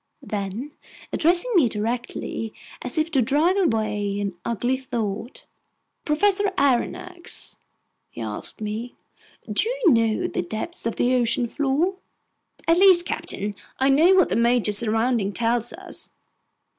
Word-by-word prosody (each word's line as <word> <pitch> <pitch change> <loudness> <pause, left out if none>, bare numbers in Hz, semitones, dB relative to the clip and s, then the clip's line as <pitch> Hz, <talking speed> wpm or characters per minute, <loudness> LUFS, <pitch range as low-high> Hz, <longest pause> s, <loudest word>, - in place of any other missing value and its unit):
Then, 210 +7 -4 0.4
addressing 350 +9 +2
me 320 - +5
directly, 225 0 -4 0.3
as 250 - -5
if 315 +1 0
to 275 -4 +3
drive 295 +10 +2
away 215 - 0
an 200 -2 -2
ugly 240 +3 0
thought: 230 -2 -4 0.6
"Professor 395 +6 +2
Aronnax," 280 +6 0 0.5
he - - -12
asked 110 - -3
me, 215 +3 -4 0.6
"do 450 - +1
you - - +3
know 225 -2 +1
the - - -1
depth 220 - -5
of 230 - -2
the 250 +1 +2
ocean 245 0 +2
floor?" 290 +9 0 0.7
"At 330 +1 +5
least, 370 -3 +6
captain, 210 - -2 0.2
I 265 +1 +2
know 325 +7 +5
what 370 - +4
the - - 0
major 235 -1 +3
soundings 225 0 +1
tell 235 +1 +2
us." 235 0 -5
245 Hz, 130 wpm, -23 LUFS, 220-325 Hz, 0.7 s, least